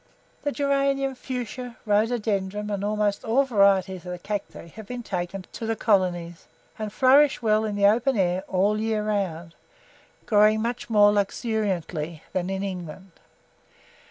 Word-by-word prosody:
The 290 Hz, -, -1 dB
geranium, 275 Hz, -1 st, 0 dB
fuschia, 250 Hz, -1 st, -6 dB
rhododendrum, 210 Hz, -2 st, 0 dB
and 200 Hz, -1 st, -2 dB
almost 210 Hz, -1 st, 0 dB
all 240 Hz, +5 st, +3 dB
varieties 195 Hz, -6 st, +2 dB
of 180 Hz, -, -7 dB
the 180 Hz, -, -4 dB
Cacti 200 Hz, -1 st, -6 dB
have 215 Hz, +4 st, -11 dB
been 245 Hz, -1 st, -6 dB
taken 185 Hz, -1 st, -4 dB
to 225 Hz, -, -5 dB
the 225 Hz, -, 0 dB
colonies, 180 Hz, -6 st, 0 dB, 0.3 s
and 215 Hz, -1 st, -4 dB
flourish 265 Hz, +3 st, +4 dB
well 215 Hz, 0 st, +2 dB
in 210 Hz, -1 st, -3 dB
the 200 Hz, 0 st, +2 dB
open 235 Hz, +5 st, +3 dB
air 185 Hz, -1 st, +1 dB
all 195 Hz, +3 st, +2 dB
the 215 Hz, -, -2 dB
year 220 Hz, -1 st, 0 dB
round, 175 Hz, -6 st, -2 dB, 0.7 s
growing 215 Hz, 0 st, +4 dB
much 235 Hz, +2 st, -3 dB
more 205 Hz, -2 st, +6 dB
luxuriantly 190 Hz, -7 st, -2 dB
than 185 Hz, 0 st, -1 dB
in 195 Hz, 0 st, -2 dB
England. 185 Hz, -1 st, -7 dB
210 Hz, 150 wpm, -25 LUFS, 190-225 Hz, 0.7 s, more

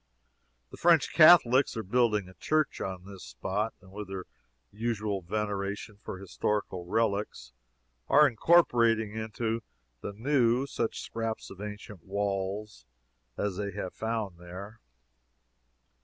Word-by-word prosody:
The -, -, -10 dB
French 170 Hz, -4 st, +4 dB
Catholics 140 Hz, -7 st, +7 dB
are 110 Hz, -, -2 dB
building 105 Hz, -2 st, +2 dB
a 95 Hz, -, -13 dB
church 155 Hz, +8 st, 0 dB
on 95 Hz, -1 st, -5 dB
this 100 Hz, -1 st, -10 dB
spot, 105 Hz, +4 st, -3 dB
and 95 Hz, 0 st, -17 dB
with 105 Hz, 0 st, -7 dB
their 95 Hz, -1 st, -6 dB, 0.5 s
usual 105 Hz, -2 st, -2 dB
veneration 100 Hz, +2 st, -3 dB
for -, -, -6 dB
historical 95 Hz, 0 st, -2 dB
relics, 105 Hz, -, -1 dB, 0.5 s
are 150 Hz, +1 st, +7 dB
incorporating 115 Hz, -6 st, +3 dB
into 110 Hz, +1 st, -2 dB, 0.4 s
the 100 Hz, -, -5 dB
new 125 Hz, +2 st, +2 dB
such 115 Hz, -4 st, -2 dB
scraps 115 Hz, -1 st, -4 dB
of 95 Hz, 0 st, -10 dB
ancient 105 Hz, -2 st, -8 dB
walls 100 Hz, -, -3 dB, 0.5 s
as 100 Hz, -3 st, -2 dB
they 100 Hz, -1 st, -3 dB
have 95 Hz, -2 st, -5 dB
found 110 Hz, -6 st, -3 dB
there. 95 Hz, +5 st, -9 dB
105 Hz, 125 wpm, -29 LUFS, 100-115 Hz, 0.5 s, Catholics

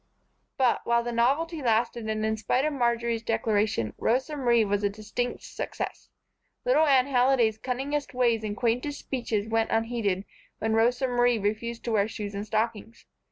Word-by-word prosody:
But, 260 Hz, -3 st, +2 dB
while 235 Hz, 0 st, +2 dB
the 240 Hz, -, -3 dB
novelty 290 Hz, +8 st, +1 dB
lasted 230 Hz, -1 st, 0 dB
and 215 Hz, 0 st, -1 dB
in 220 Hz, 0 st, +1 dB
spite 250 Hz, +5 st, 0 dB
of 305 Hz, -, 0 dB
Marjory's 235 Hz, -3 st, 0 dB
declaration, 215 Hz, -, 0 dB
Rosa 265 Hz, +6 st, 0 dB
Marie 240 Hz, -5 st, +3 dB
was 205 Hz, 0 st, 0 dB
a 205 Hz, -, +3 dB
distinct 215 Hz, +4 st, -4 dB
success. -, -, -6 dB, 0.6 s
Little 410 Hz, -11 st, +4 dB
Anne 265 Hz, -3 st, +5 dB
Halliday's 245 Hz, -4 st, +2 dB
cunningest 270 Hz, +4 st, -2 dB
ways 235 Hz, -3 st, +2 dB
and 210 Hz, -1 st, -4 dB
quaintest 250 Hz, +5 st, 0 dB
speeches 225 Hz, -5 st, -3 dB
went 225 Hz, 0 st, +1 dB
unheeded 225 Hz, -4 st, 0 dB, 0.3 s
when 220 Hz, 0 st, -1 dB
Rosa 240 Hz, +4 st, +2 dB
Marie 245 Hz, -1 st, +3 dB
refused 220 Hz, +3 st, -2 dB
to 235 Hz, -, -2 dB
wear 210 Hz, -2 st, +2 dB
shoes 210 Hz, -2 st, -6 dB
and 200 Hz, +1 st, -5 dB
stockings. 220 Hz, +1 st, -2 dB
235 Hz, 160 wpm, -27 LUFS, 220-250 Hz, 0.6 s, Anne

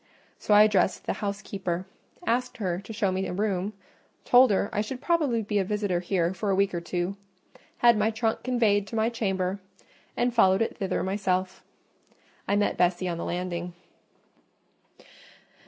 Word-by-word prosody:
So 210 Hz, -, +2 dB
I 210 Hz, -, +9 dB
addressed 200 Hz, -3 st, +2 dB
the -, -, -1 dB
housekeeper; 195 Hz, -3 st, -3 dB, 0.4 s
asked 250 Hz, +1 st, -1 dB
her 180 Hz, -5 st, -2 dB
to 200 Hz, +3 st, -10 dB
show 205 Hz, -3 st, 0 dB
me 190 Hz, +1 st, -2 dB
a -, -, -4 dB
room, 200 Hz, 0 st, -1 dB, 0.5 s
told 250 Hz, +1 st, +6 dB
her 200 Hz, 0 st, +1 dB
I 210 Hz, -, +1 dB
should 250 Hz, +4 st, -5 dB
probably 285 Hz, -7 st, +1 dB
be 210 Hz, 0 st, 0 dB
a -, -, +2 dB
visitor 205 Hz, -2 st, -1 dB
here 175 Hz, -1 st, 0 dB
for 200 Hz, +2 st, -3 dB
a 195 Hz, -, +2 dB
week 195 Hz, 0 st, +1 dB
or 175 Hz, -, -2 dB
two, 175 Hz, +3 st, -3 dB, 0.7 s
had 235 Hz, -2 st, +6 dB
my 210 Hz, +1 st, +2 dB
trunk 225 Hz, 0 st, -1 dB
conveyed 220 Hz, -5 st, +1 dB
to 210 Hz, -, -7 dB
my 220 Hz, +1 st, +2 dB
chamber, 195 Hz, -4 st, -2 dB, 0.6 s
and 245 Hz, 0 st, +1 dB
followed 190 Hz, -3 st, +4 dB
it -, -, -4 dB
thither 195 Hz, -4 st, -2 dB
myself: 190 Hz, -1 st, -1 dB, 0.8 s
I 200 Hz, -, +2 dB
met 205 Hz, 0 st, +1 dB
Bessie 180 Hz, +1 st, +1 dB
on 170 Hz, -1 st, -3 dB
the -, -, -4 dB
landing. 175 Hz, 0 st, -3 dB
200 Hz, 170 wpm, -27 LUFS, 185-220 Hz, 0.8 s, I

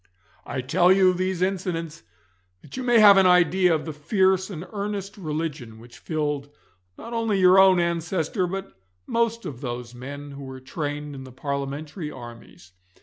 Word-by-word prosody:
I 130 Hz, -, -3 dB
tell 175 Hz, +8 st, +3 dB
you 190 Hz, -1 st, +5 dB
these 185 Hz, 0 st, -1 dB
incidents 180 Hz, -4 st, -3 dB, 0.6 s
that -, -, -11 dB
you 260 Hz, -, -4 dB
may 240 Hz, -2 st, +3 dB
have 205 Hz, -2 st, +8 dB
an 190 Hz, -1 st, +6 dB
idea 180 Hz, 0 st, +4 dB
of 155 Hz, -, -4 dB
the 160 Hz, -, -5 dB
fierce 190 Hz, +5 st, +1 dB
and 175 Hz, -3 st, -7 dB
earnest 200 Hz, -1 st, -4 dB
religion 150 Hz, -, -5 dB
which 120 Hz, +2 st, -15 dB
filled 150 Hz, -3 st, -3 dB, 0.5 s
not 230 Hz, -, -9 dB
only 225 Hz, -4 st, 0 dB
your 185 Hz, +1 st, +6 dB
own 190 Hz, -2 st, +6 dB
ancestor, 170 Hz, +2 st, -1 dB
but 195 Hz, +2 st, -6 dB, 0.3 s
most 230 Hz, 0 st, -1 dB
of 130 Hz, -3 st, -7 dB
those 120 Hz, -2 st, -5 dB
men 140 Hz, +3 st, -8 dB
who 140 Hz, 0 st, -9 dB
were 130 Hz, -1 st, -8 dB
trained 145 Hz, +2 st, -5 dB
in 135 Hz, -1 st, -8 dB
the 130 Hz, -, -11 dB
parliamentary 140 Hz, +4 st, -5 dB
armies. 105 Hz, -9 st, -12 dB
165 Hz, 165 wpm, -24 LUFS, 140-190 Hz, 0.6 s, have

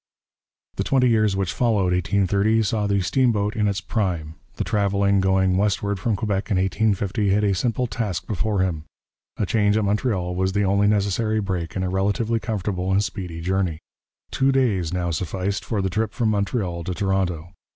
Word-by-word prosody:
The -, -, 0 dB
twenty 130 Hz, -2 st, +3 dB
years 110 Hz, -3 st, +2 dB
which 95 Hz, -2 st, -1 dB
followed 105 Hz, -7 st, +1 dB
1830 100 Hz, +4 st, +2 dB
saw 105 Hz, 0 st, 0 dB
the 100 Hz, -1 st, +1 dB
steamboat 105 Hz, +1 st, +1 dB
in 105 Hz, -1 st, +1 dB
its 100 Hz, -2 st, -1 dB
prime. 90 Hz, -6 st, -2 dB, 0.2 s
The -, -, -2 dB
traveller 100 Hz, -1 st, +1 dB
going 95 Hz, -1 st, +2 dB
westward 100 Hz, 0 st, 0 dB
from 110 Hz, +3 st, 0 dB
Quebec 100 Hz, -1 st, -2 dB
in 100 Hz, -, +1 dB
1850 100 Hz, +2 st, 0 dB
had 105 Hz, +2 st, +2 dB
a 100 Hz, -1 st, +2 dB
simple 120 Hz, +5 st, 0 dB
task 100 Hz, -5 st, -3 dB
before 105 Hz, -1 st, -1 dB
him: 85 Hz, -5 st, -2 dB, 0.5 s
a -, -, 0 dB
change 105 Hz, +1 st, +2 dB
at 110 Hz, -, +1 dB
Montreal 100 Hz, -3 st, 0 dB
was 95 Hz, +1 st, 0 dB
the 100 Hz, +1 st, +1 dB
only 100 Hz, +1 st, +3 dB
necessary 105 Hz, +1 st, +1 dB
break 90 Hz, -5 st, -3 dB
in 95 Hz, -, -1 dB
a 90 Hz, -, -1 dB
relatively 105 Hz, +4 st, 0 dB
comfortable 100 Hz, -3 st, -2 dB
and 100 Hz, +2 st, +3 dB
speedy 90 Hz, -5 st, -5 dB
journey. 90 Hz, -2 st, 0 dB, 0.5 s
Two 135 Hz, +1 st, +2 dB
days 105 Hz, -11 st, +1 dB
now 90 Hz, -1 st, -1 dB
sufficed 95 Hz, +4 st, -2 dB
for 105 Hz, -4 st, -2 dB
the 95 Hz, -, 0 dB
trip 110 Hz, +4 st, -1 dB
from 115 Hz, -3 st, 0 dB
Montreal 100 Hz, -4 st, -1 dB
to 90 Hz, -, -3 dB
Toronto. 90 Hz, -4 st, -1 dB
100 Hz, 180 wpm, -23 LUFS, 95-110 Hz, 0.5 s, twenty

